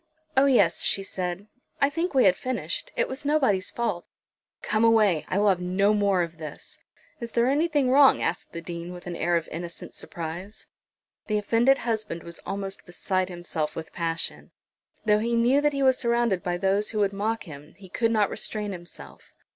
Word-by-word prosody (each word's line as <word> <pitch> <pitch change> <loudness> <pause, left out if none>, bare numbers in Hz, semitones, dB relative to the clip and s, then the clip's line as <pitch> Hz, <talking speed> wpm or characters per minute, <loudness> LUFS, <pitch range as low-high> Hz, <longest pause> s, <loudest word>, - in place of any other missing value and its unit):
"Oh, 270 +1 +5
yes," 200 -11 +4
she 195 - +1
said; 185 0 -4 0.3
"I 280 +1 +3
think 330 +1 -2
we 260 - +6
had 185 -2 +5
finished. 255 - -4
It - - +1
was 265 +2 -5
nobody's 265 -11 +2
fault." 220 -7 -2 0.6
"Come 215 +1 +1
away; 215 -8 +4
I 185 - -1
will 205 0 +4
have 185 -2 +1
no 195 +3 +2
more 200 -3 +2
of 165 -1 -7
this." 155 -2 -8 0.4
"Is 235 -2 -7
there 235 0 +3
anything 290 -1 +2
wrong?" 275 0 +6
asked 175 - -2
the 170 - -6
Dean, 170 +1 -6
with 180 0 -11
an 175 -1 -5
air 175 +1 +1
of 165 - -4
innocent 170 0 -7
surprise. 175 +5 -7 0.6
The 215 - +1
offended 230 +6 +3
husband 215 -8 -3
was 170 0 -6
almost 195 0 -4
beside 185 +1 -1
himself 175 -3 -3
with 160 - -7
passion. 165 -1 -2 0.6
Though 210 -1 +4
he 235 +2 0
knew 245 +5 +4
that 295 0 +3
he 275 -1 -1
was 260 -1 +4
surrounded 235 -6 +1
by 175 -2 -2
those 195 +3 +1
who 220 - -5
would 200 -1 +2
mock 220 +3 -1
him 150 -2 -12
he 195 -2 -13
could 230 +5 0
not 215 -3 +2
restrain 210 -2 -3
himself. 175 -2 -10
200 Hz, 190 wpm, -26 LUFS, 175-235 Hz, 0.6 s, we